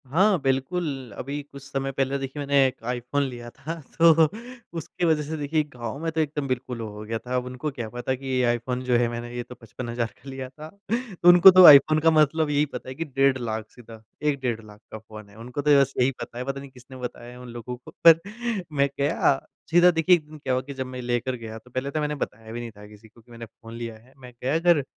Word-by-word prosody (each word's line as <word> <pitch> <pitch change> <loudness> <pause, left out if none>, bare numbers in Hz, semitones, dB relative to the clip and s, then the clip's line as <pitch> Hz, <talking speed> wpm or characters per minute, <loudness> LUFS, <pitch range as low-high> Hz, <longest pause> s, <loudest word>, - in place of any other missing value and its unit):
हाँ, 185 +7 +3
बिल्कुल 135 - -2
अभी 140 +3 -4
कुछ 140 - -10
समय 135 -1 -3
पहले 135 +1 -1
देखिए 135 +2 -6
मैंने 140 -1 +3
एक 125 - -8
आईफ़ोन 125 +4 -1
लिया 120 -3 -6
था 155 +7 -7 0.2
तो 165 0 +7 0.6
उसकी 170 +2 -3
वजह 155 -2 +2
से 155 +2 -5
देखिए 150 +1 0
गाँव 120 0 -6
में 165 - -1
तो 160 0 0
एकदम 150 -2 -2
बिल्कुल 130 -1 -3
हो 110 - -4
हो 105 +1 -9
गया 115 +1 -3
था। 125 +2 -5
अब 125 0 -1
उनको 125 +4 -4
क्या 120 -5 -6
पता 120 +3 -3
कि 135 +1 -12
ये 130 -1 +1
आईफ़ोन 120 +1 -1
जो 125 -1 +2
है 120 0 +2
मैंने 120 0 -6
ये 120 - -3
तो 125 - -12
55 120 +1 -8
हज़ार 115 -2 -2
का 140 - -9
लिया 130 -1 -6
था। 155 +3 -11 0.6
उनको 175 +2 +10
तो 185 0 +8
आईफ़ोन 155 +1 +9
का 165 +1 +4
मतलब 155 0 +3
यही 145 0 +2
पता 140 - -8
है 130 - -7
कि 165 - -4
डेढ़ 135 -2 +2
लाख 110 -3 -4
सीधा 115 -2 -14 0.2
1 150 -2 0
डेढ़ 120 -3 -2
लाख 105 -1 -14
का - - -6
फ़ोन 110 -1 -12
है। 100 - -18
उनको 125 +5 -5
तो 145 -1 +5
बस 135 0 0
यही 125 +2 +3
पता 120 - -7
है, 125 - -3
पता 135 +1 -3
नहीं 140 0 -10
किसने 130 0 -14
बताया 120 -1 -7
है 125 - -12
उन 125 -1 -10
लोगों 120 +1 -7
को। 125 - -14 0.2
पर 165 -1 +9 0.5
मैं 140 -1 +2
गया 140 -1 +2 0.3
सीधा 175 +1 +6
देखिए 165 +2 +4
1 160 -3 -5
दिन 155 - -11
क्या 135 -3 -2
हुआ 130 - +1
कि 140 +2 -9
जब 130 -1 -4
मैं 130 0 -7
लेकर 120 +1 -1
गया 110 -2 -8
तो 125 +3 -17
पहले 130 +3 -3
तो 155 - -2
मैंने 150 0 -1
बताया 110 -5 -6
भी 120 - -5
नहीं 120 -1 -6
था 105 -1 -14
किसी 105 +1 -16
को 115 +2 -21
कि 120 - -22
मैंने 115 0 -9
फ़ोन 115 +1 -14
लिया 115 -1 -6
है। 125 +4 -22
मैं 125 -2 -12
गया 135 +5 +1
घर 170 -4 +4
130 Hz, 255 wpm, -25 LUFS, 120-145 Hz, 0.6 s, उनको